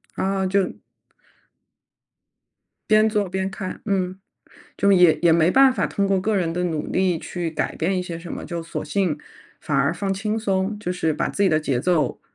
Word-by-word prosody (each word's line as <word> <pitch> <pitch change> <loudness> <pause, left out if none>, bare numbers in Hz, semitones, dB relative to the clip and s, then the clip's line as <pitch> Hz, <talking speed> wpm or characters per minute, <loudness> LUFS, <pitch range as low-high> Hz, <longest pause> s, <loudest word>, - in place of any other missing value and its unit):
啊， 195 0 0
就 195 -1 0 2.1
边 215 0 +5
做 210 -4 0
边 190 +1 -2
看， 190 -1 -6
嗯。 190 -2 -1 0.6
就 200 - +3
也 180 -4 +6
也 170 - +5
没 165 0 +4
办 265 +6 +6
法 - - 0
通 200 -1 -1
过 195 -1 +2
个 215 +2 0
人 165 -3 0
的 180 +1 -1
努 160 -4 -2
力 185 -2 +1
去 175 -2 -4
改 155 - -3
变 185 +4 0
一 180 - -1
些 170 -2 -6
什 170 0 -8
么， - - -6
就 170 -1 -4
索 165 - -5
性 185 -7 0 0.4
反 145 - -2
而 140 +4 +2
放 195 +3 -2
轻 210 +3 -2
松， 195 -1 -1
就 180 - -3
是 160 -3 0
把 150 - -1
自 - - -6
己 190 - +4
的 155 -1 +2
节 140 -5 -1
奏 155 0 0
185 Hz, 210 characters per minute, -22 LUFS, 165-195 Hz, 2.1 s, 也